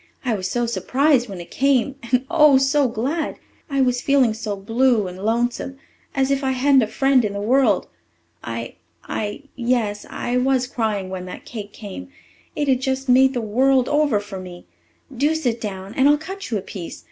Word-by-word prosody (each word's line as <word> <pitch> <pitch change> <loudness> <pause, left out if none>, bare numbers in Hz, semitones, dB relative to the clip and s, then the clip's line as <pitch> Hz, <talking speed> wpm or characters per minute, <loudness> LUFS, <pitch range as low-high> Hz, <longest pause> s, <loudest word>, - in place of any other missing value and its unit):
I 245 - +1
was 185 -3 -2
so 240 +3 0
surprised 255 +1 +1
when 190 -2 -7
it 170 - -10
came 275 -1 +2
and, 250 +2 0
oh, 300 -4 +6
so 270 +1 +3
glad! 275 +8 -2 0.3
I 275 -1 +1
was 250 -1 +1
feeling 270 -5 +3
so 215 -2 -4
blue 225 +1 +1
and 180 0 -8
lonesome 240 +4 -1 0.4
as 270 0 +1
if 275 0 0
I 265 0 +1
hadn't 265 +1 +4
a 220 - 0
friend 270 +2 +3
in 205 -2 -2
the 200 - -4
world. 225 -2 +2 0.6
I 115 0 -6 0.3
I 210 +6 -4
yes, 235 -5 -1
I 245 +1 -2
was 255 0 +2
crying 215 -6 -2
when 185 -1 -5
that 180 - -9
cake 210 -3 -7
came. 195 - -9 0.5
It 295 - -1
has 265 -2 +4
just 265 0 -2
made 265 +1 +5
the 240 - 0
world 255 +4 +2
over 290 -7 +2
for 205 -2 -8
me. 180 -1 -10 0.5
Do 295 +6 +2
sit 245 -7 -1
down 195 -1 -6
and 270 +3 +4
I'll 295 - +5
cut 380 +6 -7
you 225 - 0
a - - -3
piece. 180 -5 -8
245 Hz, 195 wpm, -21 LUFS, 210-270 Hz, 0.6 s, oh